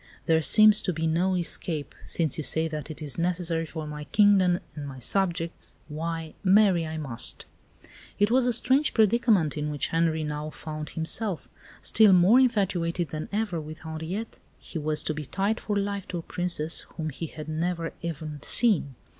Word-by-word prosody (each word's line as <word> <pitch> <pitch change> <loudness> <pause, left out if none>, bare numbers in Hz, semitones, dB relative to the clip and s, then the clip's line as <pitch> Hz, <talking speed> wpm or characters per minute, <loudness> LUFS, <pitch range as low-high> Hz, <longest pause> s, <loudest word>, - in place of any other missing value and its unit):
There 160 0 +3
seems 215 +5 +7
to 185 - -1
be 165 0 -2
no 175 +4 +1
escape; 165 -3 -3
since 160 -5 -1
you 155 - -3
say 160 +2 0
that 155 -2 -6
it 155 0 -7
is 145 +1 -2
necessary 170 -2 -1
for 160 0 -6
my 150 0 -7
kingdom 190 +1 +4
and 145 -2 -7
my 135 -1 -8
subjects, 170 - -1
why, 160 +1 -4
marry 190 -4 +4
I 160 0 -5
must." 135 -7 -2 0.7
It 205 +2 +2
was 250 0 +4
a - - +3
strange 265 +6 +2
predicament 215 - +3
in 150 0 -2
which 145 -1 -1
Henri 165 -1 +1
now 150 0 -4
found 155 0 -7
himself. 170 +3 -2 0.4
Still 215 -3 +5
more 185 +7 +6
infatuated 180 -8 0
than 155 0 -6
ever 205 -5 -2
with 155 +1 -10
Henriette, 160 +7 -6 0.2
he 165 - -7
was 150 0 0
to 155 - -2
be 155 0 -5
tied 200 - -1
for 205 -1 -2
life 200 -1 -3
to 180 - -4
a 165 - -6
Princess 170 -3 0 0.2
whom 155 -2 -3
he 165 +4 -6
had 155 0 -9
never 165 +1 -2
even 155 -3 -5
seen. 200 - +3
165 Hz, 180 wpm, -26 LUFS, 155-195 Hz, 0.7 s, seems